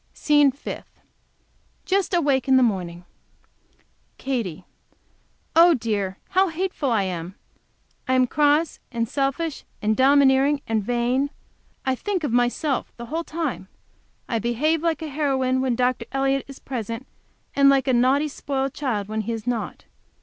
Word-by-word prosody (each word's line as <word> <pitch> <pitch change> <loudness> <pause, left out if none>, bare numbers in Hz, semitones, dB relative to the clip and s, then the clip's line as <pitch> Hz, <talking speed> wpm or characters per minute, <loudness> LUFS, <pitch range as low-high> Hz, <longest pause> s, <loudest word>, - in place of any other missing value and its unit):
SCENE 295 -2 +4
FIFTH 280 - -9 0.9
Just 390 0 +1
awake 285 -8 +1
in 265 -1 +5
the 260 - +5
morning. 180 -6 -2 1.1
Katy. 200 -10 -3 0.9
Oh, 335 0 +7
dear! 205 -5 -2
how 380 +1 +3
hateful 330 -4 -2
I 220 -4 +2
am! 180 0 -5 0.7
I 260 - +2
am 255 0 +4
cross 295 +4 +2
and 230 -2 -1
selfish, 275 +4 -2 0.2
and 215 +1 +1
domineering, 275 +1 +4
and 220 -2 0
vain. 245 +5 0 0.6
I 265 - +2
think 370 +6 -2
of 290 - -1
myself 245 +3 0
the 235 - -7
whole 330 +1 -1
time; 315 - -4 0.6
I 230 - -1
behave 285 +8 0
like 325 -1 -1
a - - -4
heroine 265 -3 0
when 260 -2 0
Dr. 250 -1 0
Elliott 270 0 0
is 275 -1 -10
present, 230 -1 -5 0.5
and 280 0 +6
like 275 -1 +3
a 260 - +3
naughty, 260 +5 +3
spoiled 275 -2 -3
child 225 -9 -2
when 215 +1 -2
he 230 +2 -3
is 225 -2 -6
not. 245 -2 -3
265 Hz, 150 wpm, -23 LUFS, 230-290 Hz, 1.1 s, Oh